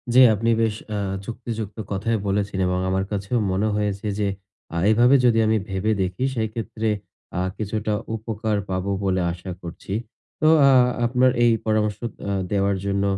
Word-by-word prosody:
জ্বি। 130 - +9
আপনি 115 +3 0
বেশ 110 -2 +1
অ্যা 105 - -2 0.3
যুক্তিযুক্ত 115 -2 -5
কথাই 110 +4 0
বলেছে 100 0 -1
এবং 90 0 0
আমার 95 0 +1
কাছেও 100 +4 -1
মনে 100 +3 +1
হয়েছে 105 0 -2
যে 105 - +1 0.5
আ - - -1
এভাবে 120 +5 +5
যদি 115 -2 +4
আমি 110 0 +3
ভেবে 95 +3 0
দেখি 95 +6 -2
সেইক্ষেত্রে 110 0 -2 0.5
আ - - +1 0.2
কিছুটা 105 0 -2 0.2
উপকার 110 -1 -2
পাবো 95 +1 -1
বলে 95 -1 +1
আশা 90 +2 -7
করছি। 85 +3 -7 0.5
তো 155 - +4 0.2
আ - - +6 0.3
আপনার 125 +1 +3
এই 120 - +5
পরামর্শ 105 -1 +1 0.3
অ্যা 100 - -2 0.2
দেওয়ার 100 -1 +1
জন্য 100 0 0
105 Hz, 160 wpm, -23 LUFS, 100-115 Hz, 0.5 s, জ্বি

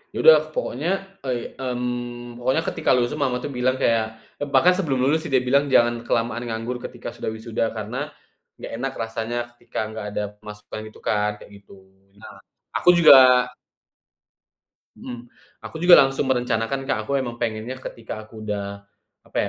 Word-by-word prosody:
Ya - - -3
udah 485 - +10 0.2
pokoknya - - -2 0.4
e 125 -2 -3
mmm, 120 -1 -4
pokoknya 130 +7 +1
ketika - - -2
lulus 120 -1 +1
tuh 150 - -5
mama 130 -3 +1
tuh 145 - -4
bilang 130 0 +1
kayak, 115 -3 +2 0.3
eee, 145 - -3
bahkan 140 +7 +5
sebelum 145 -9 -1
lulus 150 +4 +3
sih - - -9
dia 130 -1 +4
bilang, 140 +3 +2
"Jangan 120 -2 +3
kelamaan 120 +1 0
nganggur 115 +2 -4
ketika 120 -1 -7
sudah 120 - -7
wisuda 110 0 -3
karena, - - -4 0.5
nggak - - -8
enak 135 +1 -2
rasanya 115 +1 -3 0.2
ketika 120 - -7
nggak 110 -1 -6
ada 105 - 0 0.2
pemasukan," 105 0 -9
itu - - -17
kan 105 0 +1
kayak - - -14
gitu. 100 - -16 0.4
Nah, 105 -2 -13 0.4
aku 180 - +3
juga 130 -6 +7 1.4
Mhm, 120 -1 -9 0.3
aku - - -10
juga 175 0 +9
langsung 135 0 +2
merencanakan 125 +2 -1
Kak. - - +1
Aku 140 +3 0
emang 120 -2 -4
pengennya 115 +1 -3
ketika 110 -2 -7
aku 110 0 -13
udah, 100 -1 -4 0.4
apa - - -7
120 Hz, 165 wpm, -23 LUFS, 115-130 Hz, 1.4 s, udah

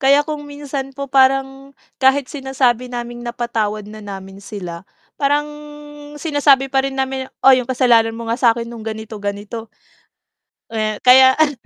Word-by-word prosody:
kaya 280 +2 +4
kung 295 -1 -6
minsan 280 -2 -6
po 280 - -3
parang, 270 +1 +1 0.2
kahit 265 +1 +4
sinasabi 260 -3 0
naming 240 0 -6
napatawad 235 -3 -3
na 215 +1 -10
namin 195 -1 -9
sila 180 -4 -7 0.4
parang 290 +1 +2 0.7
sinasabi 290 -3 +3
pa 270 0 +1
rin 270 0 -4
namin, 265 0 -2
"Oh, 265 0 +7
yung 255 0 -2
kasalanan 235 -3 +4
mo 230 - -6
nga 230 - 0
sa'kin 235 -1 +2
nung 235 -1 -9
ganito 220 0 -6
ganito." 205 +3 -5 1.0
Eh, 215 -1 -1
kaya 260 +1 +7
ano 310 -2 +3
255 Hz, 150 wpm, -19 LUFS, 225-270 Hz, 1.0 s, Oh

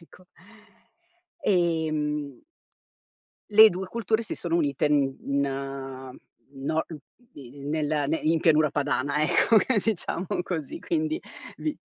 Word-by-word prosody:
Ecco. 180 +2 -19 1.2
Ehm 155 - 0 1.1
le 215 +1 +9
2 185 +2 -5
culture 225 +2 -1
si 220 - -5
sono 170 -1 -2
unite 145 -3 +1
n 150 - +3 0.3
in 135 -2 -4 0.3
no 145 +3 -2
uhm, 160 - -9 0.2
di 230 - -14
di 140 - -14
nel 150 0 0
ne 160 +2 0
in 160 +1 +2
pianura 155 -2 +4
padana 145 0 0
ecco, 220 +8 +3 0.3
diciamo 190 -4 -2 0.2
così, 160 -6 -5
quindi 315 0 -1 0.4
vi 305 -1 -3
155 Hz, 120 wpm, -26 LUFS, 140-185 Hz, 1.2 s, le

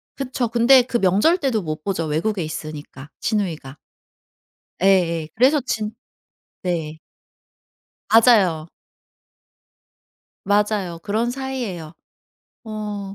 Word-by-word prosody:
그쵸. 255 -2 -2
근데 240 +3 +6
그 245 0 -1
명절 205 - +3
때도 265 - 0
못 155 -3 -5
보죠 185 -5 -2
외국에 170 +6 -1
있으니까 155 -3 -8
시누이가. 165 - -2 1.0
예예. 170 -5 +2
그래서 270 +5 +4
진 220 -4 -3 0.7
네. 160 -4 -3 1.1
맞아요. 200 -9 +4 1.8
맞아요 205 -4 0
그런 220 +4 -1
사이에요. 245 - -5 0.7
어 210 -2 -5
200 Hz, 195 characters per minute, -21 LUFS, 165-235 Hz, 1.8 s, 근데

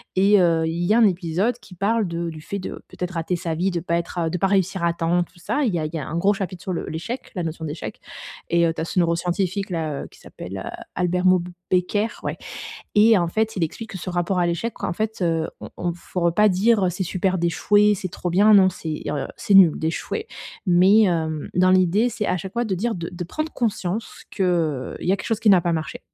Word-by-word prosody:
Et 200 +2 +5
heu, 165 -2 +3
il 165 +2 -2
y 210 - +3
a - - +4
un 235 - +6
épisode 185 +4 +1
qui 190 -6 -15
parle 210 +3 +1
de 170 0 -3
du 155 - -10
fait 200 - -5
de 185 - -7
peut-être 180 0 -5
rater 170 +1 -2
sa 170 -1 -3
vie, 175 +4 0
de 175 -2 -2
pas 170 0 -1
être 170 +1 -3
heu, - - 0
de - - -1
pas 195 - +3
réussir 190 -2 +1
à 170 - +3
temps 170 +1 +1
tout 175 - -19
ça, 285 +11 -1
il 240 - +2
y - - 0
a 155 - -2
il 155 - -6
y 165 - -2
a 140 - -6
un 165 - -3
gros 195 +4 +3
chapitre 185 -3 -5
sur 190 - -3
le 170 - -4
l'échec, 210 +11 -5
la 180 - -2
notion 160 0 -5
d'échec. 145 -8 -6 0.5
Et 170 0 +3
heu, 165 - +1
tu 160 - -5
as - - -2
ce 170 - -6
neuroscientifique 180 +3 0
là, 160 -5 -2
heu, - - -8
qui - - -19
s'appelle, 95 +1 -8
heu, - - -7
Albert 180 0 0
Moukheiber, 180 +3 0
ouais, - - -3 0.6
et 215 +1 +6
en 170 -1 0
fait, 220 +5 0
il 180 - -1
explique 220 +8 -7
que 190 - -5
ce 185 - -7
rapport 175 +1 0
à 175 - +2
l'échec, 170 +7 -3
en - - -1
fait, 220 +2 -3
heu, 165 -2 +1
on - - -7
on 175 - -2
faut 175 +1 -6
re 170 0 +2
pas 210 +2 +5
dire, 205 +2 +3
heu: - - +1
«C'est 185 +2 -3
super 185 +1 0
d'échouer, 205 +5 +3
c'est 185 -1 -4
trop 175 +1 -4
bien.» 205 +5 +5
Non 190 -2 +6
c'est, 160 -4 -5
heu, 145 -2 -2
c'est - - -2
nul 185 -5 +7
d'échouer. 170 - -3 0.4
Mais, 185 +4 +6
hem, 160 -5 -1
dans 185 +1 +4
l'idée, 185 +5 +3
c'est, 215 -3 -3
à - - +1
chaque 190 +3 -7
fois 240 0 0
de 205 -4 -1
dire, 225 +5 -1
de 170 -2 -5
de 175 0 -6
prendre 310 - -4
conscience 215 -2 -3
que, - - -13
heu, 160 -8 0
il - - -4
y - - +5
a - - +2
quelque - - -7
chose 225 -2 -1
qui 220 - +5
n'a 190 -2 +6
pas 170 - 0
marché, 155 -3 -3
180 Hz, 260 wpm, -23 LUFS, 170-200 Hz, 0.6 s, nul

